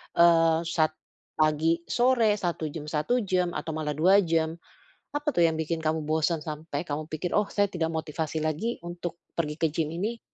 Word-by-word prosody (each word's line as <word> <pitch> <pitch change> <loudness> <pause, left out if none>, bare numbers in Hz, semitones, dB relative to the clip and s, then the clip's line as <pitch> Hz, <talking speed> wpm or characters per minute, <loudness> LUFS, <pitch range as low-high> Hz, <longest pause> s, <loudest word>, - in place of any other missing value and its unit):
eee, 165 -1 +5
sat 160 -2 +2 0.5
pagi, 155 +2 +3
sore, 240 -3 +3
1 170 -3 -2
jam, 150 -1 -7
1 155 +12 +1
jam, 180 -2 +1
atau 155 +2 -3
malah 155 -1 -2
2 185 +6 +5
jam. 160 -1 0 0.6
Apa 295 +1 0
tuh 170 - +3
yang 160 - 0
bikin 160 +1 -1
kamu 160 0 0
bosan, 160 +1 +1
sampai 155 -1 -4
kamu 150 +1 -3
pikir, 165 +3 -3
"Oh, 210 -1 +3
saya 205 0 +2
tidak 165 -3 -1
motivasi 160 0 -3
lagi 160 +10 -1
untuk 175 0 -5 0.2
pergi 150 -3 -1
ke 165 - +3
gym 155 -2 0
ini." 220 +6 -2
165 Hz, 180 wpm, -27 LUFS, 155-175 Hz, 0.6 s, eee